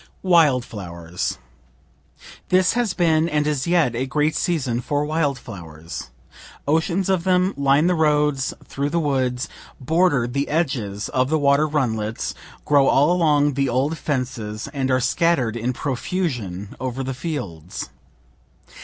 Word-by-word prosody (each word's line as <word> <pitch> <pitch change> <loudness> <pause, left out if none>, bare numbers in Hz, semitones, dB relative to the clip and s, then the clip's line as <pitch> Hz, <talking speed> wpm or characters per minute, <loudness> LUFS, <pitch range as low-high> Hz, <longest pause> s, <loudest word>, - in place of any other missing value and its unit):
WILD 155 -9 +4
FLOWERS 85 -4 -5 1.1
This 185 0 +4
has 235 -5 0
been 165 -1 +2
and 150 -1 +1
is 150 -2 -1
yet 165 -9 +2
a 130 +3 -1
great 150 +3 +1
season 135 -9 0
for 145 +4 -1
wild 150 -3 0
flowers; 85 - -9 0.6
oceans 170 +5 +1
of 190 -3 +1
them 185 +1 +2
line 140 +2 +3
the 180 - +3
roads 150 -4 +2
through 140 +1 -2
the 170 - 0
woods, 130 -4 0 0.3
border 160 -2 +2
the 140 +4 -2
edges 120 -11 -1
of 130 0 +1
the 160 - +2
water 145 +1 +3
runlets, 115 -7 -1 0.3
grow 140 -2 +4
all 145 +5 +4
along 150 -5 +3
the 135 0 0
old 135 +6 +1
fences, 125 -8 -3
and 135 -2 -1
are 130 0 +3
scatter'd 130 -2 +1
in 120 +2 -1
profusion 125 - -3
over 130 +1 -3
the 135 +1 -3
fields. 100 - -5
140 Hz, 140 wpm, -22 LUFS, 125-160 Hz, 1.1 s, WILD